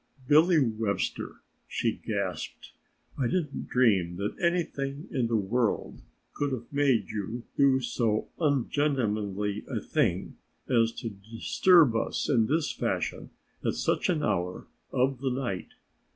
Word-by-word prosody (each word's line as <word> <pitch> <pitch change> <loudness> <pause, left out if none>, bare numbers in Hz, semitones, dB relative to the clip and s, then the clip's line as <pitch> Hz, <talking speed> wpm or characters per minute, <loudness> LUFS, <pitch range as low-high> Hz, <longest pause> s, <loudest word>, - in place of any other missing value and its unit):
"Billy 160 +5 +6
Webster," 110 -5 -1 0.3
she - - 0
gasped, - - -4 0.5
"I 130 - +2
didn't 155 -2 -2
dream 100 -9 +3
that 100 +3 -2
anything 155 -5 -1
in 125 -4 +1
the 115 - 0
world 110 +3 0 0.3
could 145 -1 -1
have 120 +2 -6
made 140 -4 +2
you 110 +3 -4
do 135 -2 +4
so 115 -3 0
ungentlemanly 110 - 0
a - - -1
thing - - -1 0.3
as 115 -3 +3
to 115 - -5
disturb 115 - +3
us 110 - -1
in 115 -6 +3
this 155 +2 +1
fashion - - -2 0.3
at - - 0
such - - 0
an 160 -4 +1
hour 90 -4 -1 0.3
of 130 0 +1
the 135 0 -1
night. 125 -7 -3
125 Hz, 130 wpm, -28 LUFS, 110-140 Hz, 0.5 s, Billy